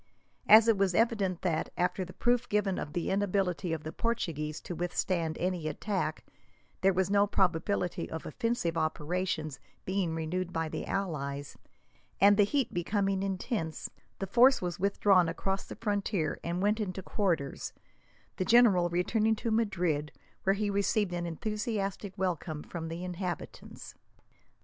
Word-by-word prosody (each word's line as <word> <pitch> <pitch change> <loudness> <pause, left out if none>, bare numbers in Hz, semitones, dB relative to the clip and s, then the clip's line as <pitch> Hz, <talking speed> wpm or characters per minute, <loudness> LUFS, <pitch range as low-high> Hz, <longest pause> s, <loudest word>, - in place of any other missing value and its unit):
As 220 +1 +9
it 225 -4 +4
was 190 -3 +2
evident 205 -6 +1
that, 170 -4 0
after 180 +2 0
the 180 - -9
proof 245 +3 +1
given 205 -2 +1
of 150 - -5
the 175 - -1
inability 190 -3 0
of 160 -2 -3
the 155 - -5
Portuguese 160 -11 -2
to - - -6
withstand 175 -1 -1
any 180 -3 -1
attack, 190 +6 -2 0.6
there 195 - +5
was 190 +1 0
no 205 0 +4
probability 180 -1 0
of 160 - -6
offensive 230 -2 -1
operations 155 -2 -2 0.3
being 185 -4 -1
renewed 175 +3 -2
by 165 -1 -2
the - - -5
allies; 145 -7 -3 0.6
and, 200 +2 +7
the 205 0 +5
heat 275 +3 0
becoming 195 +2 0
intense, 190 - -3 0.3
the 195 - -3
force 250 +7 +5
was 175 0 -4
withdrawn 195 -2 +4
across 195 +3 -2
the - - -7
frontier 200 -6 -1
and 175 +2 -2
went 210 +2 +2
into 190 -2 -3
quarters, 170 -11 -1 0.7
the - - 0
general 200 -6 +5
returning 215 +6 +1
to 225 +1 -3
Madrid, 180 -9 0 0.3
where 195 +1 +2
he 205 0 -1
received 200 -1 +1
an 175 0 -2
enthusiastic 200 +1 -3
welcome 170 -4 -2
from 165 -2 -6
the 170 +2 -5
inhabitants. 180 0 -6
185 Hz, 150 wpm, -30 LUFS, 170-205 Hz, 0.7 s, As